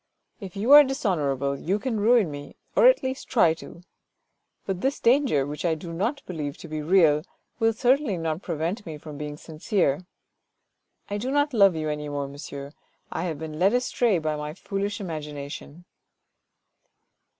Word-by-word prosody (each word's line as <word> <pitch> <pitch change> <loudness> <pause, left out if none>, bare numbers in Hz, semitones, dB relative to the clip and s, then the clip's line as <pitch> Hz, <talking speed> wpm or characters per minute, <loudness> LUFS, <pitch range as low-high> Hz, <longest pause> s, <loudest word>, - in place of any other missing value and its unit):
If 195 -5 -9
you 215 +7 0
are 295 0 +11
dishonour 200 - 0
able, 140 +1 -2
you 190 +5 0
can 225 -1 -2
ruin 220 -5 +4
me, 145 0 -9 0.2
or - - +7
at - - +5
least 260 0 -4
try 175 -10 +4
to. 170 +1 -12 0.8
But 190 -2 -3
this 270 +2 0
danger, 240 - +3
which 150 +1 -6
I 165 -2 +2
do 165 +2 -8
not 235 - -2
believe 150 -5 -5
to - - -10
be 155 -1 -4
real, 155 -2 +4 0.4
will 225 -1 +3
certainly 245 -2 +2
not 165 0 -2
prevent 170 +5 -3
me 155 -2 -6
from 150 -1 -10
being 150 0 -5
sincere. 160 0 -1 1.0
I 205 0 -3
do 250 +5 -3
not 290 +1 +1
love 200 -6 +5
you 155 -1 -2
any 150 -1 -3
more, 145 -1 -3
monsieur, 140 0 -8 0.4
I 165 - -2
have 165 -4 -3
been 155 0 -7
led 195 +4 +4
astray 245 -4 +2
by 155 -2 -1
my 150 +1 -5
foolish 200 +2 -3
imagination." 150 -2 -7
170 Hz, 170 wpm, -25 LUFS, 150-220 Hz, 1.0 s, are